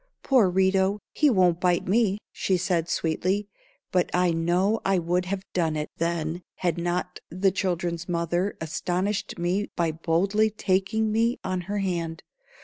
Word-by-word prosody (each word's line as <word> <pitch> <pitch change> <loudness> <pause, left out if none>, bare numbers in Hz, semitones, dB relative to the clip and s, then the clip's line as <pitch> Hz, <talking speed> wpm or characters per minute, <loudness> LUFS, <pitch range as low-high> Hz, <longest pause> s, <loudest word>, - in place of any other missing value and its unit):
"Poor 250 -8 +4
Rito, 190 +2 +2 0.2
he 300 - +4
won't 180 -7 +3
bite 180 -1 +2
me," 205 0 +2
she 190 - 0
said, 175 -2 0
sweetly; 185 +5 0 0.4
but 180 -1 +2
I 180 -1 +3
know 175 +6 +1
I 195 0 +2
would 175 +1 0
have 190 +1 -3
done 165 -3 +1
it 150 0 -3
then, 165 0 -1
had 175 -2 -1
not 180 +1 -2
the 185 +3 +1
children's 175 -2 -2
mother 175 +3 -1
astonished 180 +5 -2
me 180 +4 -1
by 170 -2 +1
boldly 190 +7 +1
taking 215 +1 0
me 230 +3 +2
on 185 -1 -2
her 205 - -1
hand. 170 -4 -2
180 Hz, 150 wpm, -26 LUFS, 170-195 Hz, 0.4 s, Poor